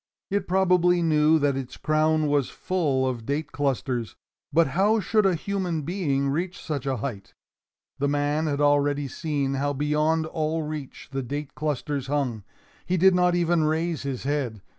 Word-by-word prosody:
It 200 Hz, -1 st, 0 dB
probably 180 Hz, -1 st, +3 dB
knew 155 Hz, 0 st, +4 dB
that 145 Hz, -2 st, +1 dB
its 130 Hz, -1 st, -6 dB
crown 155 Hz, 0 st, +2 dB
was 145 Hz, -3 st, +1 dB
full 150 Hz, -8 st, 0 dB
of 120 Hz, -3 st, -3 dB
date 145 Hz, +4 st, -3 dB
clusters, 130 Hz, -5 st, -2 dB, 0.4 s
but 165 Hz, 0 st, +3 dB
how 200 Hz, +9 st, +3 dB
should 210 Hz, +1 st, +2 dB
a 185 Hz, -, +2 dB
human 180 Hz, -3 st, -2 dB
being 140 Hz, -5 st, 0 dB
reach 175 Hz, +6 st, -2 dB
such 140 Hz, -4 st, -4 dB
a 135 Hz, -1 st, 0 dB
height? 105 Hz, -4 st, -6 dB, 0.6 s
The 140 Hz, -, +1 dB
man 145 Hz, +2 st, 0 dB
had 145 Hz, -1 st, -1 dB
already 145 Hz, 0 st, +2 dB
seen 140 Hz, -1 st, -2 dB
how 140 Hz, +1 st, 0 dB
beyond 150 Hz, +3 st, +1 dB
all 160 Hz, 0 st, -2 dB
reach 150 Hz, -3 st, -7 dB
the 135 Hz, 0 st, -2 dB
date 145 Hz, +3 st, -5 dB
clusters 145 Hz, -2 st, -2 dB
hung. 135 Hz, -7 st, -1 dB, 0.4 s
He 185 Hz, -, 0 dB
did 190 Hz, +2 st, +6 dB
not 180 Hz, 0 st, +3 dB
even 170 Hz, -2 st, +2 dB
raise 160 Hz, 0 st, 0 dB
his 135 Hz, -3 st, -4 dB
head. 130 Hz, -7 st, -2 dB
150 Hz, 165 wpm, -25 LUFS, 140-165 Hz, 0.6 s, did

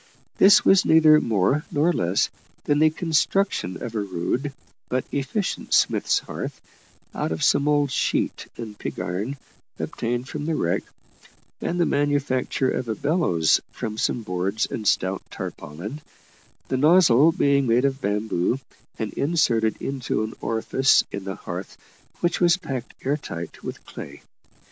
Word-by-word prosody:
This 200 Hz, +2 st, +7 dB
was 195 Hz, 0 st, +6 dB
neither 155 Hz, -1 st, +6 dB
more 115 Hz, +7 st, +1 dB
nor 155 Hz, +4 st, +2 dB
less 90 Hz, -, +1 dB, 0.3 s
than 145 Hz, 0 st, +1 dB
the 155 Hz, 0 st, +6 dB
construction 160 Hz, -, 0 dB
of 115 Hz, -, -5 dB
a 110 Hz, -, -1 dB
rude 100 Hz, +9 st, -2 dB, 0.4 s
but 130 Hz, 0 st, -1 dB
efficient 145 Hz, +9 st, -1 dB
smith's -, -, +3 dB
hearth -, -, -5 dB, 0.5 s
out -, -, -2 dB
of 80 Hz, -1 st, -2 dB
some 145 Hz, -, +3 dB
old 145 Hz, -2 st, +2 dB
sheet -, -, -1 dB
and 110 Hz, -3 st, -7 dB
pig -, -, -5 dB
iron 105 Hz, +11 st, -3 dB, 0.4 s
obtained 120 Hz, +2 st, -3 dB
from 150 Hz, +1 st, -5 dB
the 165 Hz, -, 0 dB
wreck, 85 Hz, -, 0 dB, 0.8 s
and 175 Hz, -, -2 dB
the 170 Hz, -, +4 dB
manufacture 140 Hz, -2 st, 0 dB
of 120 Hz, -, -3 dB
a 110 Hz, -, -1 dB
bellows 140 Hz, -, +2 dB
from 110 Hz, -2 st, -5 dB
some 120 Hz, -, 0 dB
boards 95 Hz, +2 st, -1 dB
and 110 Hz, -2 st, -4 dB
stout 95 Hz, +1 st, +1 dB
tarpaulin, 90 Hz, -, -7 dB, 0.7 s
the 130 Hz, -, 0 dB
nozzle 155 Hz, -1 st, +6 dB
being 140 Hz, -3 st, +2 dB
made 120 Hz, +3 st, +3 dB
of 135 Hz, 0 st, -1 dB
bamboo, 105 Hz, +2 st, 0 dB, 0.4 s
and 110 Hz, -2 st, -4 dB
inserted 120 Hz, -8 st, +1 dB
into 130 Hz, -5 st, -2 dB
an 110 Hz, -, -4 dB
orifice 130 Hz, +4 st, +3 dB
in 100 Hz, -1 st, -5 dB
the 95 Hz, -1 st, -4 dB
hearth -, -, -7 dB, 0.4 s
which 175 Hz, +1 st, 0 dB
was 175 Hz, +1 st, +5 dB
packed 130 Hz, -8 st, -6 dB
air 140 Hz, +3 st, +1 dB
tight 85 Hz, -, -7 dB
with -, -, -7 dB
clay. -, -, -10 dB
130 Hz, 150 wpm, -24 LUFS, 105-150 Hz, 0.8 s, This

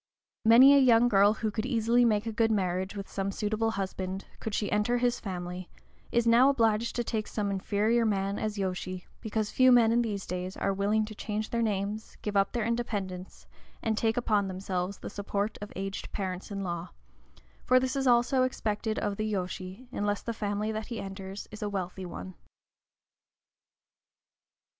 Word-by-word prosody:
Many 250 Hz, +5 st, +9 dB
a 280 Hz, -, +7 dB
young 245 Hz, -2 st, +5 dB
girl 200 Hz, -1 st, +5 dB
who 220 Hz, -1 st, -2 dB
could 215 Hz, +3 st, -2 dB
easily 240 Hz, -1 st, +3 dB
make 215 Hz, -1 st, +2 dB
a 225 Hz, -, -2 dB
good 225 Hz, 0 st, +2 dB
marriage 190 Hz, -1 st, -1 dB
with 195 Hz, -1 st, -5 dB
some 195 Hz, 0 st, -2 dB
suitable 215 Hz, +2 st, -1 dB
husband, 190 Hz, -2 st, -4 dB
could 220 Hz, -2 st, -3 dB
she 205 Hz, -, -1 dB
enter 210 Hz, +4 st, +2 dB
his 245 Hz, 0 st, +1 dB
family, 180 Hz, -2 st, -5 dB, 0.4 s
is 235 Hz, 0 st, +2 dB
now 235 Hz, +4 st, +6 dB
obliged 230 Hz, -4 st, +2 dB
to 240 Hz, -, 0 dB
take 220 Hz, -2 st, -2 dB
some 205 Hz, -2 st, -2 dB
inferior 210 Hz, +4 st, +1 dB
man 200 Hz, -2 st, 0 dB
as 215 Hz, -1 st, -2 dB
yōshi, 185 Hz, -1 st, -3 dB
because 215 Hz, -1 st, -2 dB
few 255 Hz, 0 st, +5 dB
men 235 Hz, -2 st, +6 dB
in 235 Hz, +1 st, +3 dB
these 205 Hz, -4 st, -3 dB
days 180 Hz, +1 st, -4 dB
are 195 Hz, -, 0 dB
willing 205 Hz, +2 st, +1 dB
to 215 Hz, -, -8 dB
change 215 Hz, +1 st, -4 dB
their 235 Hz, -, 0 dB
names, 210 Hz, 0 st, -2 dB
give 210 Hz, -1 st, -3 dB
up 195 Hz, 0 st, +3 dB
their 235 Hz, -3 st, -1 dB
independence, 205 Hz, -6 st, -3 dB, 0.4 s
and 220 Hz, -1 st, +1 dB
take 225 Hz, +1 st, 0 dB
upon 210 Hz, -4 st, +2 dB
themselves 185 Hz, 0 st, -3 dB
the -, -, -7 dB
support 205 Hz, +1 st, -3 dB
of 205 Hz, -, -7 dB
aged 195 Hz, +1 st, -5 dB
parents 185 Hz, -2 st, -4 dB
in 200 Hz, -1 st, -4 dB
law; 175 Hz, -1 st, -4 dB, 0.7 s
for 255 Hz, 0 st, +5 dB
this 260 Hz, +1 st, -1 dB
also 245 Hz, +2 st, +4 dB
is 255 Hz, -, +4 dB
expected 220 Hz, -2 st, -2 dB
of 205 Hz, -1 st, -1 dB
the 215 Hz, 0 st, -1 dB
yōshi, 185 Hz, +4 st, -5 dB
unless 205 Hz, -3 st, -1 dB
the 230 Hz, -, -3 dB
family 210 Hz, 0 st, -2 dB
that 215 Hz, 0 st, -4 dB
he 235 Hz, -2 st, -5 dB
enters 195 Hz, 0 st, -7 dB
is 215 Hz, -, -9 dB
a 210 Hz, -, -1 dB
wealthy 185 Hz, -1 st, -4 dB
one. 185 Hz, +2 st, -7 dB
210 Hz, 180 wpm, -29 LUFS, 195-230 Hz, 0.7 s, Many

